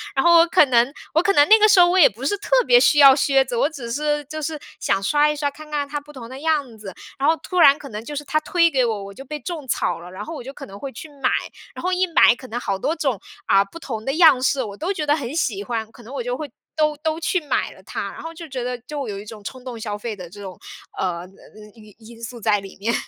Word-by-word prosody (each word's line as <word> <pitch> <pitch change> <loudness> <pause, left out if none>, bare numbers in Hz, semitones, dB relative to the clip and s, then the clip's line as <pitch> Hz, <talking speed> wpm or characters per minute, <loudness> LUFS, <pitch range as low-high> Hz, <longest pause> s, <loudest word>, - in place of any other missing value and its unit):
然 270 - +2
后 340 -1 +7
我 335 - +5
可 335 -2 +5
能 245 0 +3 0.2
我 325 - +4
可 395 +2 +2
能 290 0 +5
那 440 0 +8
个 430 - +6
时 390 - +6
候 350 - +7
我 370 +1 +3
也 310 - +8
不 235 +7 -9
是 410 - +1
特 - - +2
别 485 0 +6
需 300 - +4
要 275 -2 +9
靴 275 -2 +3
子， 245 -1 -4
我 280 +6 +2
只 250 -7 -8
是 295 +2 -1
就 310 +2 -6
是 305 0 -4 0.2
想 195 - 0
刷 295 +7 +3
一 300 - -1
刷， 290 -1 -1
看 310 +1 -13
看 290 -1 -2
它 295 +1 -4
不 295 +1 -16
同 240 -3 -10
的 260 +1 -9
样 290 -7 -1
子。 205 -2 -9 0.3
然 280 - +1
后 325 - +4
突 365 -1 -3
然 285 -2 +7
可 280 - -10
能 215 +1 -7
就 295 - -6
是 295 - -4
它 305 +2 0
推 335 +1 +3
给 260 -5 +1
我， 215 -3 -2
我 200 - -10
就 270 - -10
被 300 +3 -6
种 315 -6 -6
草 200 - -1
了。 175 +1 -11
然 195 +3 -7
后 330 - -7
我 245 - -7
就 270 +2 -8
可 - - -9
能 195 +1 -11
会 275 -1 -6
去 315 - -10
买， - - +3 0.5
然 - - -7
后 365 - 0
一 370 +1 +2
买 325 -7 +5
可 255 - -12
能 240 0 -4
好 200 -5 -2
多 315 - -1
种， 270 - -1 0.3
啊， 195 0 +4
不 335 +12 -12
同 225 -8 -6
的 270 - -1
样 310 -6 +6
式， 265 0 +1
我 205 -2 -7
都 355 +5 -2
觉 305 -5 -3
得 295 +1 +3
很 275 -2 -5
喜 205 -10 -1
欢， 225 -1 -4
可 240 - -16
能 240 +5 -11
我 265 - -3
就 245 +1 -2
会 300 -3 -6 0.3
都 305 -1 +1
都 315 +2 -2
去 360 +2 0
买 295 - -1
了 - - -17
它， - - -5
然 - - -10
后 330 0 -7
就 330 0 -9
觉 255 -2 -4
得 250 0 -3
就 280 +1 -6
有 200 -2 -5
一 205 - -10
种 215 -1 -11
冲 255 +3 -8
动 245 -3 -7
消 210 -2 -4
费 215 0 -5
的 180 -3 -10
这 205 +2 -12
种， 190 -2 -8 0.4
呃， 175 -2 -2
呃 180 - -10
嗯 210 +2 -16
因 215 -3 -16
因 230 +1 -15
素 235 +1 -7
在 210 -2 +2
里 195 -1 -12
面。 230 +4 -1
270 Hz, 320 characters per minute, -21 LUFS, 225-310 Hz, 0.5 s, 要